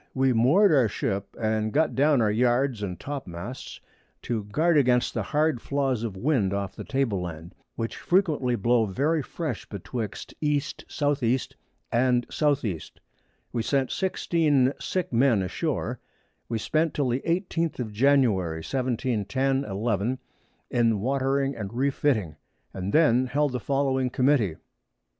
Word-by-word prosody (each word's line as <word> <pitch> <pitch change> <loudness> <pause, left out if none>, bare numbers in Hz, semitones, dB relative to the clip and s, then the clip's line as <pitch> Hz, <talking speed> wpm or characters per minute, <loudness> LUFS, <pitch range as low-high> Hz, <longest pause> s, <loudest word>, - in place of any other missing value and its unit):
We 130 -1 +3
moor'd 150 - +5
our 130 -6 +5
Ship, 100 -1 -2
and 110 -1 0
got 155 +5 +2
down 140 -3 +3
our 105 - +2
Yards 120 +1 +1
and 90 -4 -4
Topmasts 125 -4 -7 0.4
to 110 -4 -2
guard 160 +11 +2
against 125 -4 +3
the 115 - -1
hard 150 +3 0
Flaws 135 -4 -1
of 110 -5 -4
Wind 105 -5 +1
off 100 -2 -3
the - - -7
Table 130 -9 -1
Land, 85 +1 -7 0.2
which 115 0 -4
frequently 155 -9 +1
blow 115 +1 +2
very 145 - +1
fresh 145 -3 -5
betwixt 105 +2 -5
E. 150 -1 +2
S. 140 - -4 0.5
E. 120 +2 +2 0.5
and 125 0 +2
S. 145 -3 +1
E. 90 -7 -2 0.7
We 120 - 0
sent 135 +2 0
16 155 -8 +1
sick 185 -8 -3
Men 115 -4 +3
a - - -2
shoar. - - -2 0.5
We 115 - -1
spent 155 +8 0
till 140 -4 +1
the 125 +3 0
18th 170 -1 -1
of 115 -4 -3
January, 105 -10 +2
1710 130 +2 -1
11. 105 +4 -1 0.5
in 115 -3 +2
watering 135 +3 0
and 105 -4 -5
re 140 +3 +2
fiting, 110 - 0 0.4
and 95 +1 -4
then 130 -5 +4
held 145 +2 +1
the 125 - -2
following 135 0 0
Committee. 125 - +2
125 Hz, 150 wpm, -26 LUFS, 110-140 Hz, 0.7 s, moor'd